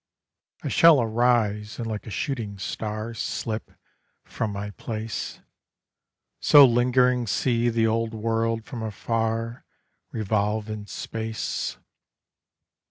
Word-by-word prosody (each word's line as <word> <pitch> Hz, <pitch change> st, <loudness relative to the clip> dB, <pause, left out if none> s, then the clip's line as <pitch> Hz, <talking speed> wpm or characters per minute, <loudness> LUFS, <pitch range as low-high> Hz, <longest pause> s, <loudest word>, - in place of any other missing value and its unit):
I -, -, -2 dB
shall 165 Hz, -4 st, +6 dB
arise, 110 Hz, -2 st, +1 dB
and 120 Hz, -, -4 dB
like 110 Hz, -1 st, -5 dB
a -, -, -5 dB
shooting 110 Hz, -1 st, -3 dB
star 110 Hz, +3 st, -4 dB
Slip 110 Hz, 0 st, -3 dB, 0.5 s
from 110 Hz, -2 st, -3 dB
my 100 Hz, +1 st, -5 dB
place; 110 Hz, +2 st, -5 dB, 1.0 s
So 145 Hz, -1 st, +8 dB
lingering 125 Hz, 0 st, +3 dB
see 120 Hz, +4 st, +1 dB
the 115 Hz, -1 st, +2 dB
old 115 Hz, 0 st, 0 dB
world 115 Hz, 0 st, -1 dB
from 125 Hz, -5 st, -6 dB
afar 115 Hz, +2 st, -2 dB, 0.5 s
Revolve 110 Hz, 0 st, -1 dB
in 105 Hz, -1 st, -6 dB
space. 110 Hz, +1 st, -4 dB
115 Hz, 105 wpm, -25 LUFS, 110-120 Hz, 1.0 s, So